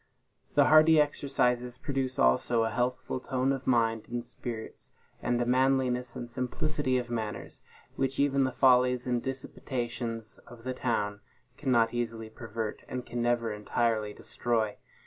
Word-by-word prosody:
The 145 -1 +6
hardy 155 +1 +7
exercises 125 -4 +1
produce 135 -2 -2
also 90 - +3
a 110 - 0
healthful 125 +3 -1
tone 130 +1 0
of 135 0 -3
mind 115 -3 +2
and 120 0 -3
spirits, 120 -2 -7 0.3
and 120 0 0
a 120 - +1
manliness 125 -1 +2
and 120 - -5
simplicity 130 +2 -1
of 120 -1 -3
manners, 110 -3 -4 0.4
which 135 0 -1
even 140 -1 +3
the 130 - +1
follies 125 -1 +4
and 125 -1 0
dissipations 120 -3 -4
of 115 -1 -13
the 130 +1 -2
town 105 -5 -1 0.3
cannot 120 -5 +2
easily 115 -2 -3
pervert, 110 -1 -5
and 125 -1 -5
can 120 - -3
never 120 -1 +1
entirely 110 +1 0
destroy. 110 -1 -1
125 Hz, 145 wpm, -29 LUFS, 115-130 Hz, 0.4 s, hardy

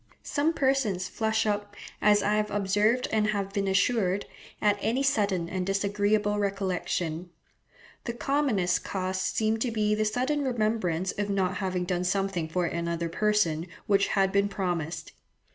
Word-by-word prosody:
Some 305 +3 0
persons 265 - +1
flush 220 +2 0
up, 205 -1 -2 0.3
as 210 0 +4
I 210 - +2
have 210 0 +1
observed 205 +5 +1
and 215 -1 +2
have 200 -2 -2
been 200 -1 0
assured, 195 -1 +1 0.3
at 205 -1 +2
any 250 +5 +1
sudden 200 -9 +1
and 185 +1 -2
disagreeable 205 +2 +1
recollection. 185 -4 -2 0.8
The 235 - -2
commonest 235 -9 +1
cause 185 -1 -2
seems 220 +3 0
to 245 - 0
be 210 -2 +1
the 215 0 +1
sudden 255 +7 0
remembrance 215 -8 0
of 205 0 -3
not 195 -1 0
having 185 -2 -1
done 180 0 -1
something 185 -3 -1
for 180 +2 0
another 170 0 -2
person 175 -4 +1 0.2
which 200 -2 +3
had 195 -1 +2
been 200 +1 +2
promised. 175 -5 -3
200 Hz, 150 wpm, -28 LUFS, 185-215 Hz, 0.8 s, as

